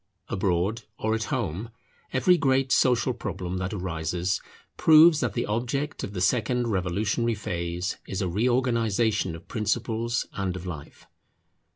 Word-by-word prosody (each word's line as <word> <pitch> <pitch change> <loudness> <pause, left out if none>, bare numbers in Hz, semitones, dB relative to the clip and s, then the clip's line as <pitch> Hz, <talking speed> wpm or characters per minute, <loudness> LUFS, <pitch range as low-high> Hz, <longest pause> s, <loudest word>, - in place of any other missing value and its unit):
Abroad 95 +3 0 0.2
or 110 0 0
at 110 0 -1
home, 110 -3 -3 0.4
every 180 +8 +4
great 135 -4 +2
social 125 0 +3
problem 95 -4 -4
that 90 0 -3
arises 90 -1 -2 0.3
proves 160 0 +7
that 125 -7 -1
the - - -1
object 125 +7 -2
of 100 - -5
the 90 - -3
second 120 +5 +1
revolutionary 105 +5 0
phase 90 -2 -3
is 95 - -3
a 95 - 0
reorganization 115 -2 +1
of 80 - -12
principles 115 +1 -1
and 95 -2 -2
of 90 0 -7
life. 80 -5 -8
105 Hz, 140 wpm, -26 LUFS, 90-120 Hz, 0.4 s, proves